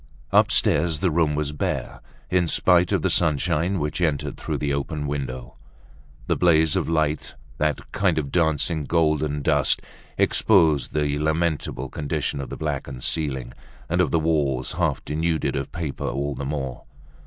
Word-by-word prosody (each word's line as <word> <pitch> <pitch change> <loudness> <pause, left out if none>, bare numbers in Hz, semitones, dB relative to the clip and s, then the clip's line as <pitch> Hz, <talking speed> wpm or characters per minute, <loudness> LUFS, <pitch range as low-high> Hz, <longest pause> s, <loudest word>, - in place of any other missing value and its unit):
Upstairs 80 +1 +3
the 90 +1 +1
room 80 -2 +2
was 75 -1 -1
bare, 75 - -3 0.3
in 90 -2 +3
spite 90 +1 +3
of - - +1
the - - +2
sunshine 85 +3 +1
which 75 +2 -2
entered 75 -4 0
through - - -3
the 70 -1 -1
open 75 +2 -3
window. 65 -4 -5 0.7
That - - 0
blaze 80 -3 +4
of - - 0
light, 80 -2 0 0.2
that 75 -1 -1
kind - - +1
of 70 -3 -2
dancing 80 -2 +1
golden 75 -3 +1
dust, - - +3 0.4
exposed 80 -10 +3
the 75 -1 0
lamentable 80 -4 -1
condition 70 -1 -2
of 65 - -7
the - - -6
blackened 65 -3 -4
ceiling, 65 -6 -2 0.3
and 90 +3 +1
of 90 - +2
the 85 - +2
walls 75 -5 0
half - - -1
denuded 80 +1 -1
of 70 -1 -3
paper, 80 -5 -4
all 70 +3 -2
the 70 - -5
more. 65 -3 -4
75 Hz, 155 wpm, -24 LUFS, 70-80 Hz, 0.7 s, blaze